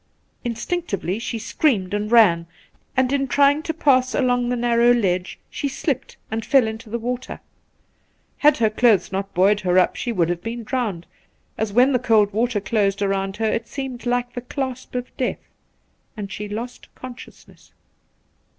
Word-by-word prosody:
' - - -43
Instinctively 230 - -3
she 230 0 -4
screamed 215 -4 0
and 210 +1 -2
ran, 175 -8 +5 0.5
and 260 +1 +2
in 275 -1 +1
trying 285 +3 +4
to 320 - -3
pass 260 -5 +2
along 245 -2 +1
the 250 - +1
narrow 240 0 +3
ledge 185 -6 0
she 285 - -3
slipped 275 -1 -3
and 225 0 -2
fell 270 0 +4
into 220 +1 -6
the 235 - -2
water. 245 +2 -4 1.0
Had 300 0 +5
her 220 -2 +2
clothes 215 -4 +3
not 195 +1 -3
buoyed 200 +3 +4
her 185 -2 +1
up 185 - +3
she 240 - -3
would 175 -6 +1
have 175 -1 -2
been 230 +2 -5
drowned, 215 -8 -2 0.5
as 220 -1 -2
when 250 +6 +4
the 250 - +3
cold 220 -4 +3
water 230 0 +1
closed 200 -1 0
round 195 0 -1
her 225 - -1
it 230 0 -2
seemed 255 -1 -6
like 245 0 0
the 245 - -5
clasp 260 0 -5
of 250 0 -4
death, 255 - -3 0.7
and 200 -2 -6
she 210 +1 -6
lost 230 +4 -6
conscious 255 -1 -11
ness.' - - -21
235 Hz, 175 wpm, -22 LUFS, 205-255 Hz, 1.0 s, ran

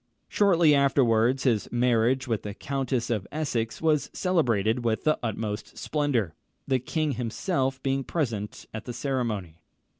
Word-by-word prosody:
Shortly 175 -7 +4
afterwards, 130 -3 +3
his 115 -6 +1
marriage 125 +2 +2
with 115 -3 -1
the 105 -1 -6
Countess 130 -2 -2
of 105 -4 -1
Essex 130 -6 -2
was 155 -2 +2
celebrated 120 - +1
with 115 -2 0
the 155 - +2
utmost 110 -2 -4
splendour, 135 - 0 0.3
the 130 -1 +2
king 155 +4 -1
himself 135 - -2
being 135 0 0
present 115 -10 -3
at 110 0 -6
the 120 - -5
ceremony. 115 - -3
125 Hz, 140 wpm, -27 LUFS, 110-140 Hz, 0.3 s, Shortly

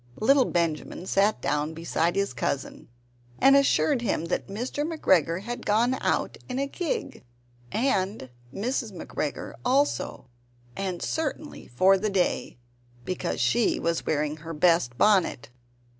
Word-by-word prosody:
Little 270 +3 +4
Benjamin 170 +1 -2
sat 200 +3 +1
down 150 +3 -1
beside 170 +1 0
his 200 0 0
cousin 135 - -3 0.5
and 275 +1 +6
assured 280 -1 +3
him 195 -8 -1
that - - -2
Mr. 245 +8 -3
McGregor 185 - +1
had 240 +2 -5
gone 235 +5 +2
out - - -1
in 255 - -3
a 275 - 0
gig, 320 - -4 0.5
and 195 - -1 0.2
Mrs. 240 - -2
McGregor - - -4
also; 270 - 0 0.5
and 185 -3 -3
certainly 310 -1 -4
for 190 +10 +4
the 215 +2 -1
day, 185 -9 -1 0.5
because 185 -1 -3
she 135 - +2
was 170 -1 -1
wearing 150 0 0
her 165 +1 -7
best 165 -7 +2
bonnet. 190 -11 +2
195 Hz, 130 wpm, -26 LUFS, 165-250 Hz, 0.5 s, and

